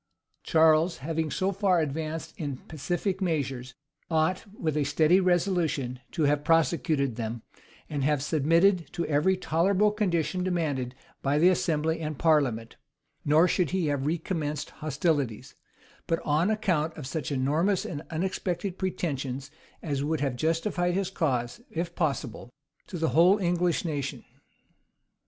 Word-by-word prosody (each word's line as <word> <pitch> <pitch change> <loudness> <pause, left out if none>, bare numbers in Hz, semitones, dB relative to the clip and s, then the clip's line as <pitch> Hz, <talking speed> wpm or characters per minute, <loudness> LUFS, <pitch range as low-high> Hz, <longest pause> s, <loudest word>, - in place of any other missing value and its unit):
[*] - - -48
Charles, 160 +1 +4
having 160 -1 -1
so 190 +6 0
far 195 -2 +2
advanced 155 +1 -3
in 145 -4 -4
pacific 175 +7 -3
measures, 135 -7 -2 0.3
ought, 165 +4 +1
with 155 -3 -1
a 150 - +2
steady 155 +5 +4
resolution, 175 -8 +1
to 165 - 0
have 145 0 +2
prosecuted 160 -5 +2
them, 115 0 -4 0.4
and 145 -3 -3
have 145 -1 +1
submitted 165 +5 +2
to 170 - -2
every 155 +6 +2
tolerable 190 +5 +2
condition 185 -4 0
demanded 145 -9 -1 0.3
by 140 +1 +1
the 170 +4 +6
assembly 160 -2 0
and 155 -2 -4
parliament; 135 -9 +1 0.5
nor 155 +4 +5
should 180 -3 +1
he 185 -2 0
have 145 -2 -1
recommenced 155 -2 -2
hostilities, 145 -6 -1 0.5
but 165 - +2
on 155 +6 +2
account 180 -8 0
of 150 - -6
such 145 0 -4
enormous 155 +9 +1
and 145 -4 -5
unexpected 180 +2 -2
pretensions 140 -7 -3 0.3
as 140 -4 -2
would 155 +1 0
have 135 -3 -1
justified 175 - 0
his 190 -1 -1
cause, 125 -10 -1
if 170 +1 -3
possible, 140 -8 -2 0.4
to 180 - -6
the 160 0 +1
whole 170 +9 +5
English 175 -2 0
nation. 145 -4 -3
160 Hz, 140 wpm, -27 LUFS, 145-175 Hz, 0.5 s, the